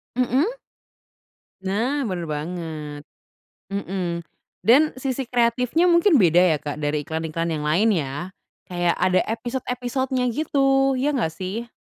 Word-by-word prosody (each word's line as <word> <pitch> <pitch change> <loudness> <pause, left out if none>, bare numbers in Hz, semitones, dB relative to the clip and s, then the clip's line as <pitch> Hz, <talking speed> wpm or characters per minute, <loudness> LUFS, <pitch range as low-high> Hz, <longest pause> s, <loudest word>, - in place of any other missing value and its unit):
Mhm. 255 - +2 1.1
Nah 225 +10 0
bener 175 -2 -3
banget, 155 -1 -5 0.7
mhm, 185 -3 -3 0.4
dan 285 +7 +5
sisi 265 0 -2
kreatifnya 250 +8 +2
mungkin 340 - +5
beda 175 0 +5
ya, - - 0
Kak, 145 0 -5
dari 150 0 -1
iklan-iklan 160 +2 -3
yang 150 -2 -2
lain 180 +9 +3
ya, 145 +3 -3 0.4
kayak 175 -1 +1
ada 185 0 +4
episode-episodenya 250 +2 -2
gitu, 270 0 +2
ya 285 - +1
nggak 165 -11 0
sih? 210 +7 -5
200 Hz, 120 wpm, -23 LUFS, 165-255 Hz, 1.1 s, dan